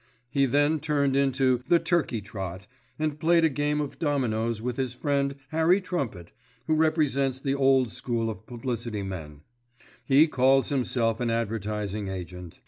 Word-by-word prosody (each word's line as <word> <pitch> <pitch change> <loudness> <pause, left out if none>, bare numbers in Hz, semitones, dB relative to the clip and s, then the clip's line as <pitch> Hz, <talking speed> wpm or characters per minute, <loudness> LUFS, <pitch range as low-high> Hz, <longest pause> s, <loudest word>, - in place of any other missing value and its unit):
He 140 -1 +2
then 145 +4 +2
turned 145 -3 +1
into 135 -2 +2
"The 175 - +5
Turkey 165 -10 0
Trot" 95 -3 -6 0.3
and 155 -1 -2
played 165 +1 +4
a - - +4
game 145 +1 0
of 145 -2 -4
dominoes 115 -7 0
with 120 +2 -3
his 130 -2 -2
friend 140 0 0
Harry 160 +5 +3
Trumpet, 135 - -4 0.3
who 155 - +1
represents 150 -4 +1
the 135 0 -1
old 135 -3 +3
school 115 -2 -2
of 110 -1 -6
publicity 120 -3 -4
men: 80 -6 -7 0.6
he 140 +3 +5
calls 135 -1 +3
himself 120 -4 0
an 120 - 0
advertising 105 -2 -2
agent. 90 -2 -7
130 Hz, 150 wpm, -27 LUFS, 110-145 Hz, 0.6 s, The